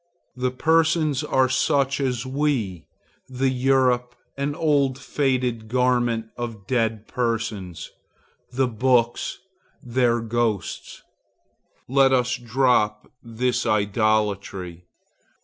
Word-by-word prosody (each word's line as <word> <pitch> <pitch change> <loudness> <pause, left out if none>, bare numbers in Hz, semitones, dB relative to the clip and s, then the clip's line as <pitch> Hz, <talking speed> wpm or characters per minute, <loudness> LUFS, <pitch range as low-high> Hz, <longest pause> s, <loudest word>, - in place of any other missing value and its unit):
The 125 0 0
persons 160 +1 +2
are 130 -3 +2
such 135 +2 +1
as 125 -2 -1
we; 130 - -1 0.4
the 130 +1 0
Europe, 125 -1 +1 0.2
an 140 +1 -2
old 140 -5 +1
faded 130 -5 -1
garment 120 -2 +1
of 115 -5 -6
dead 110 -2 -1
persons; 110 -8 -3 0.6
the 130 +1 +1
books, 120 0 +1 0.5
their 120 -1 +1
ghosts. 115 -3 -3 0.8
Let 135 +1 +4
us 125 -1 +2
drop 120 -3 +1
this 120 +1 -1
idolatry. 100 -4 0
125 Hz, 95 wpm, -23 LUFS, 110-130 Hz, 0.8 s, Let